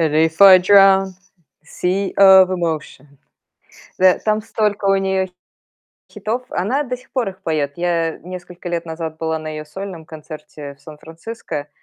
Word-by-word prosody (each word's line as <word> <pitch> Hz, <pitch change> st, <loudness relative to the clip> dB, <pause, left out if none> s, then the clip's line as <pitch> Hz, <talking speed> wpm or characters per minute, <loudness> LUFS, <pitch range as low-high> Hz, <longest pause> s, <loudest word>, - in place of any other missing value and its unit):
Before 160 Hz, +4 st, +5 dB
I -, -, +7 dB
drown. 195 Hz, 0 st, +5 dB, 0.5 s
Sea 185 Hz, +4 st, -2 dB
of 190 Hz, -1 st, +7 dB
emotion. 160 Hz, -6 st, -4 dB, 0.9 s
Да, 185 Hz, -1 st, +4 dB
там 215 Hz, 0 st, 0 dB
столько 210 Hz, -2 st, -2 dB
у 195 Hz, 0 st, +4 dB
неё 190 Hz, -1 st, 0 dB, 0.8 s
хитов, 220 Hz, +4 st, -4 dB
она 240 Hz, +11 st, -1 dB
до 250 Hz, -3 st, -5 dB
сих 250 Hz, -, -22 dB
пор 245 Hz, -6 st, -1 dB
их 190 Hz, 0 st, -10 dB
поёт. 150 Hz, -3 st, -1 dB
Я 170 Hz, -2 st, -1 dB
несколько 180 Hz, -1 st, -9 dB
лет 170 Hz, -1 st, -3 dB
назад 160 Hz, -1 st, -6 dB
была 160 Hz, 0 st, -2 dB
на 155 Hz, 0 st, -7 dB
её 155 Hz, 0 st, -6 dB
сольном 180 Hz, +1 st, -8 dB
концерте 155 Hz, -2 st, -10 dB
в 140 Hz, -, -31 dB
Сан-Франциско, 160 Hz, +1 st, -8 dB
180 Hz, 145 wpm, -19 LUFS, 160-195 Hz, 0.9 s, I